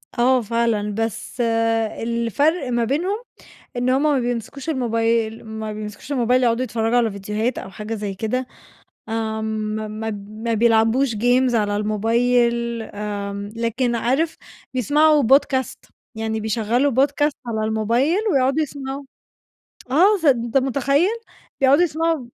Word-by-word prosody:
آه، 255 Hz, +1 st, +3 dB
فعلًا. 230 Hz, -2 st, 0 dB
بس 225 Hz, +2 st, -3 dB, 0.6 s
الفَرْق 235 Hz, -, 0 dB
ما 240 Hz, -1 st, +1 dB
بينهم، 340 Hz, -, 0 dB, 0.6 s
إن 245 Hz, +1 st, 0 dB
هم 265 Hz, +3 st, +2 dB
ما 295 Hz, -3 st, +3 dB
بيمسكوش 245 Hz, +4 st, -4 dB
الموبايل 230 Hz, -4 st, 0 dB
ما 220 Hz, -1 st, -5 dB
بيمسكوش 210 Hz, +5 st, -8 dB
الموبايل 250 Hz, -1 st, +2 dB
يقعدوا 235 Hz, +1 st, +2 dB
يتفرّجوا 225 Hz, -1 st, 0 dB
على 230 Hz, -2 st, +2 dB
فيديوهات 210 Hz, +5 st, -2 dB
أو -, -, -6 dB
حاجة 215 Hz, +3 st, -5 dB
زي 205 Hz, -2 st, -4 dB
كده، 240 Hz, +5 st, -2 dB, 0.6 s
آمم 220 Hz, -1 st, -2 dB
ما 215 Hz, 0 st, -4 dB
ما 220 Hz, +1 st, -4 dB, 0.2 s
ما 225 Hz, +2 st, -3 dB
بيلعبوش 225 Hz, +3 st, +3 dB
games 245 Hz, +3 st, +2 dB
على 205 Hz, -2 st, +1 dB
الموبايل، 235 Hz, +2 st, +1 dB
آمم، 205 Hz, -1 st, -5 dB
لكن 235 Hz, +2 st, 0 dB
عارف 270 Hz, +8 st, 0 dB, 0.4 s
بيسمعوا 295 Hz, +4 st, +4 dB
podcast، 265 Hz, +1 st, +1 dB, 0.2 s
يعني 220 Hz, 0 st, -2 dB
بيشغّلوا 230 Hz, +5 st, +1 dB
podcast 290 Hz, +1 st, 0 dB
على 220 Hz, -2 st, -2 dB
الموبايل 230 Hz, -, +1 dB
ويقعدوا 270 Hz, +2 st, +2 dB
يسمعوه، 275 Hz, -1 st, -5 dB, 0.9 s
آه. 380 Hz, +9 st, +5 dB
س -, -, -3 dB
أنت 240 Hz, -3 st, +3 dB
مُتخيّل؟! 275 Hz, +5 st, +2 dB, 0.5 s
بيقعدوا 275 Hz, +5 st, +5 dB
يسمعوا 325 Hz, -3 st, 0 dB
235 Hz, 130 wpm, -21 LUFS, 220-270 Hz, 0.9 s, آه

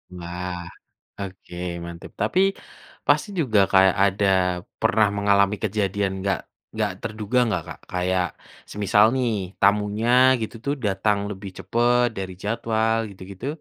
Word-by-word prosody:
Wah, 90 Hz, +1 st, -5 dB, 0.6 s
oke 95 Hz, -2 st, -8 dB, 0.3 s
mantep. 85 Hz, 0 st, -9 dB
Tapi 145 Hz, -, +2 dB, 0.7 s
pasti -, -, +3 dB
juga 115 Hz, -9 st, +2 dB
kayak 95 Hz, -1 st, +5 dB
ada 100 Hz, +1 st, +1 dB, 0.5 s
pernah 105 Hz, 0 st, +3 dB
mengalami 100 Hz, 0 st, +3 dB
kejadian 100 Hz, -2 st, 0 dB
nggak 100 Hz, 0 st, 0 dB, 0.4 s
nggak -, -, 0 dB
terduga 110 Hz, +2 st, -2 dB
nggak, 90 Hz, -7 st, -1 dB
Kak? -, -, -8 dB
Kayak 90 Hz, 0 st, 0 dB, 0.5 s
semisal 105 Hz, +1 st, +3 dB
nih, 125 Hz, -3 st, +1 dB, 0.3 s
tamunya 105 Hz, +3 st, +2 dB, 0.3 s
gitu 110 Hz, +1 st, -4 dB
tuh 140 Hz, -, +1 dB
datang 100 Hz, +1 st, +1 dB
lebih 100 Hz, 0 st, -7 dB
cepet 120 Hz, +6 st, +2 dB
dari 95 Hz, -1 st, -4 dB
jadwal 110 Hz, +1 st, 0 dB
gitu-gitu? 95 Hz, +4 st, -9 dB
100 Hz, 125 wpm, -23 LUFS, 95-110 Hz, 0.7 s, kayak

